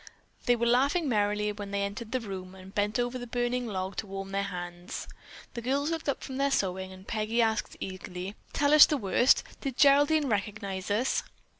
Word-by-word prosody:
They 245 - +5
were 235 0 0
laughing 275 +7 +3
merrily 210 -2 +1
when 205 -1 -7
they 200 0 -1
entered 210 +3 -5
the 255 - +1
room 190 -3 -7
and 190 +1 -12
bent 205 +2 0
over 245 +1 -1
the 245 - -7
burning 245 +1 -1
log 190 -2 -4
to 210 - -3
warm 195 0 -6
their 195 0 0
hands. 175 -2 -6 0.5
The 235 - -5
girls 280 +6 0
looked 325 -3 -2
up 280 - -2
from 265 - -6
their 280 +1 +2
sewing 190 -6 -1
and 190 +1 -13
Peggy 220 +1 -1
asked 220 -2 +1
eagerly: 185 0 -6 0.2
"Tell 285 +1 +2
us 305 - +10
the 300 - +1
worst! 240 +3 +3 0.2
Did 270 -4 -4
Geraldine 290 +2 +5
recognize 200 -3 -2
us?" 225 +6 +1
215 Hz, 195 wpm, -29 LUFS, 195-255 Hz, 0.5 s, us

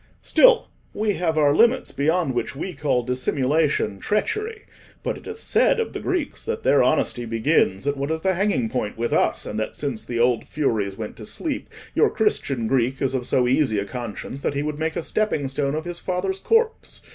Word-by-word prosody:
Still - - +5 0.3
we 210 0 +1
have 165 -3 0
our 145 -1 +4
limits 235 +5 +3
beyond 155 0 +1
which 120 - -2
we 180 +6 -4
call 135 -4 0
dissimulation 130 -2 0
treachery. 425 - -2 0.4
But - - -1
it - - -12
is 445 0 -6
said 470 - +3
of 455 - -2
the - - -4
Greeks 360 -6 -2
that 460 0 -3
their - - +4
honesty 120 - +1
begins 115 -2 +1
at 145 0 0
what 140 +1 -2
is 160 0 -1
the 190 +1 +2
hanging 190 - +1
point 110 -3 -3
with 120 0 -1
us, - - +1
and 105 - -4
that 110 - -3
since 135 -7 -3
the 120 -1 -4
old 120 -1 +2
Furies 110 -10 -1
went 110 -1 -6
to 110 - -9
sleep, 300 -4 -4 0.2
your 440 - +4
Christian 140 - 0
Greek 130 +2 +1
is 135 -1 0
of 125 -2 -2
so 125 -1 +2
easy 130 -4 +2
a 100 - -1
conscience 120 +4 -6
that 140 - -1
he 140 - 0
would 150 0 -3
make 160 0 -1
a - - -2
stepping 185 -10 0
stone 140 +1 -1
of 155 +1 -3
his 175 0 -4
father's 190 +1 -2
corpse." 455 - 0
145 Hz, 205 wpm, -23 LUFS, 125-190 Hz, 0.4 s, Still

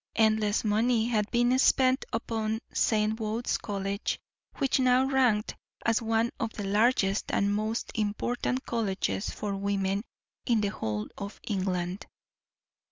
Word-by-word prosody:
Endless 220 -1 +2
money 225 +2 +2
had 215 -3 +1
been 240 +2 +3
spent 260 0 +4
upon 220 -1 -1 0.2
St. 215 0 +1
Wode's 220 +2 -1
College, 200 0 -3 0.4
which 270 0 +1
now 255 0 +4
ranked 250 -6 +2 0.3
as 230 0 +2
one 225 +1 +1
of 225 -4 -1
the 205 - -5
largest 205 -1 +2
and 200 0 +2
most 215 +2 -2
important 240 +4 -1
colleges 205 -3 -1
for 205 -2 -3
women 195 0 0 0.5
in 230 -3 +3
the 205 - +1
whole 105 - -3
of 200 0 -6
England. 185 -2 -2
215 Hz, 130 wpm, -28 LUFS, 200-235 Hz, 0.5 s, spent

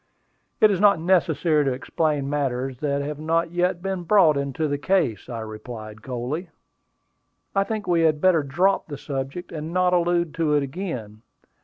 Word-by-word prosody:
"It 215 - +6
is 190 - 0
not 200 -4 +5
necessary 160 -3 +2
to 135 -2 0
explain 145 +1 -1
matters 135 -3 -2
that 140 -1 -1
have 150 +1 -5
not 165 +2 0
yet 175 0 0
been 190 -2 -2
brought 175 -4 +4
into 140 +2 -1
the 145 -1 -2
case," 165 - 0
I 115 -2 -4
replied 110 0 -8
coldly. 130 +8 -4 1.1
"I 195 - +4
think 215 -1 -3
we 170 -2 +2
had 155 -2 +3
better 175 -1 +4
drop 175 +8 +1
the 145 -3 -6
subject, 135 +6 -5
and 155 0 -5
not 180 0 +2
allude 175 -2 +1
to 155 -3 +1
it 145 - +2
again. 130 - -6
155 Hz, 170 wpm, -24 LUFS, 135-175 Hz, 1.1 s, It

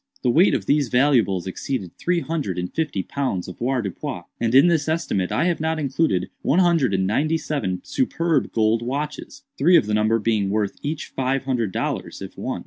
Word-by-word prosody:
The 125 - +3
weight 175 +10 +4
of - - -3
these 145 -3 +2
valuables 120 -8 +2
exceeded 95 0 -4
three 180 -1 0
hundred 150 - -3
and 90 0 -4
fifty 150 -12 -1
pounds 130 -10 -3
avoirdupois; 115 0 -3 0.2
and 115 +1 +1
in 135 - +8
this 160 -3 +2
estimate 155 - -1
I - - +1
have 175 -2 0
not 160 0 0
included 140 - 0
one 155 - +1
hundred 165 - +3
and 95 0 +1
ninety 150 +11 +1
seven 140 - -3
superb 170 - 0
gold 110 0 +2
watches; 150 - -5 0.2
three 180 0 +6
of - - +2
the 105 - -2
number 110 +1 +3
being 105 -3 0
worth 105 -1 -1
each 150 +1 -4
five 135 +1 0
hundred 125 -6 -1
dollars, - - -3
if - - -8
one. - - -4
130 Hz, 190 wpm, -22 LUFS, 105-155 Hz, 0.2 s, in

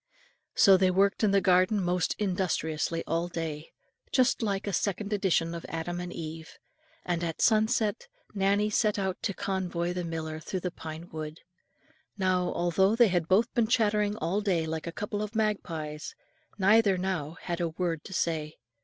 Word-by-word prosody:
So 195 -1 +7
they 185 0 +3
worked 195 +4 +2
in 215 - +5
the 195 0 +4
garden 185 +2 +4
most 180 -2 0
industriously 170 -4 -1
all 165 +1 -1
day, 160 -3 -5 0.4
just 255 -2 +3
like 200 -3 -1
a 200 - -3
second 200 +3 -1
edition 180 -4 +1
of 170 - -6
Adam 170 +2 -3
and 175 0 -5
Eve; 160 -1 -7 0.5
and 175 -1 -1
at 165 -2 -3
sunset 220 - +2 0.3
Nannie 200 +1 +2
set 210 0 +2
out 190 -2 -2
to 200 - -2
convoy 180 -3 -2
the 180 0 -3
miller 160 -1 -4
through 185 +3 -4
the 180 - -2
pine 160 0 -8
wood. 155 0 -6 0.8
Now, 185 -2 +1
although 190 +4 +2
they 235 -2 +5
had 175 -3 0
both 215 +7 +3
been 235 -3 +2
chattering 210 -3 +2
all 195 +1 -1
day 180 -6 +1
like 160 +1 -4
a - - -3
couple 205 +3 -4
of 210 +1 -5
magpies, 160 -9 -2 0.4
neither 200 0 +4
now 180 -4 -3
had 175 0 -4
a 170 - 0
word 165 -1 -2
to 190 - -8
say. 155 -3 -1
185 Hz, 170 wpm, -29 LUFS, 165-205 Hz, 0.8 s, So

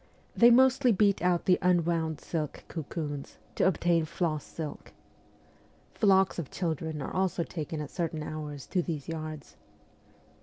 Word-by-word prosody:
They 235 - +7
mostly 260 +1 +5
beat 200 -1 +3
out 180 -1 +1
the 180 - +4
unwound 170 -3 +1
silk 155 -4 -4
cocoons 150 -3 -5 0.2
to - - +2
obtain 170 -2 +2
floss 155 -2 -2
silk. 155 -3 -7 1.0
Flocks 190 -3 +3
of 155 - -5
children 160 -3 -3
are - - -5
also 185 -2 0
taken 160 -1 -5
at 150 - -7
certain 165 -3 -3
hours 150 -2 -6
to 185 - 0
these 160 -5 -4
yards. 155 -2 -6
165 Hz, 140 wpm, -29 LUFS, 155-180 Hz, 1.0 s, They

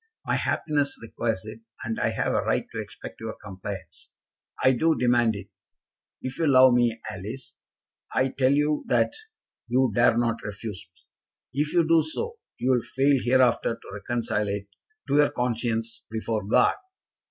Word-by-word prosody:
My - - 0
happiness 145 -3 0
requires 115 -3 -3
it, 110 +1 -8 0.2
and 115 0 -3
I - - +2
have - - -1
a - - +2
right - - 0
to - - -3
expect - - -10
your 110 0 -5
compliance. 95 -3 -8 0.5
I 130 - +7
do 160 +6 +2
demand 120 -3 +3
it. 100 - -8 0.7
If 130 0 -5
you 165 - +2
love 130 -2 +7
me, 120 -2 +2
Alice, 110 +6 -8 0.5
I 130 +1 +2
tell 130 0 +2
you 150 +1 +2
that - - +2 0.5
you 125 0 +2
dare 120 +1 +4
not 115 -1 0
refuse 105 -1 -6
me. 130 +9 -9
If 150 0 -1
you 170 -2 +3
do 165 0 +5
so, 460 - -4 0.2
you 130 - +1
will 125 -2 +3
fail 135 +2 +2
hereafter 125 -2 +3
to 115 - -15
reconcile 105 0 -2
it 100 0 -3 0.4
to 145 - +2
your 145 -1 +5
conscience 115 -2 -2
before 110 -1 -2
God." 125 +4 +4
120 Hz, 165 wpm, -26 LUFS, 110-135 Hz, 0.7 s, I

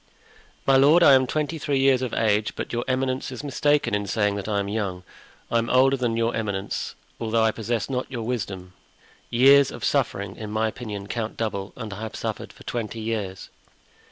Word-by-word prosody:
"My 135 -1 +5
lord, 150 +6 +6
I 140 - +8
am 130 -1 +5
twenty 155 +3 -2
three 140 -1 0
years 135 -1 +4
of 130 -3 -2
age; 105 -1 +1
but - - -5
your 120 0 -1
eminence 130 0 -1
is 130 +2 -7
mistaken 145 -3 +1
in 105 0 0
saying 105 -1 +1
that 100 - -5
I 105 -2 0
am 100 - -2
young. 100 -4 -3 0.5
I 115 - +3
am 115 - -2
older 135 +2 +5
than 120 -3 -1
your 115 0 +1
eminence, 100 -3 -3 0.2
although 115 0 +1
I 110 - +4
possess 115 0 -2
not 130 -1 -3
your 120 -4 -4
wisdom. 100 -6 -4 0.6
Years 135 +3 +6
of - - -9
suffering, 100 0 -1
in 110 -1 -6
my 110 +1 0
opinion, 105 -3 -6
count 110 +1 -4
double, 105 -3 -3
and 110 -5 -6
I 100 - -8
have 110 -1 -5
suffered - - -4
for - - -16
twenty 115 -1 -4
years." 110 -4 -4
115 Hz, 200 wpm, -24 LUFS, 105-130 Hz, 0.6 s, I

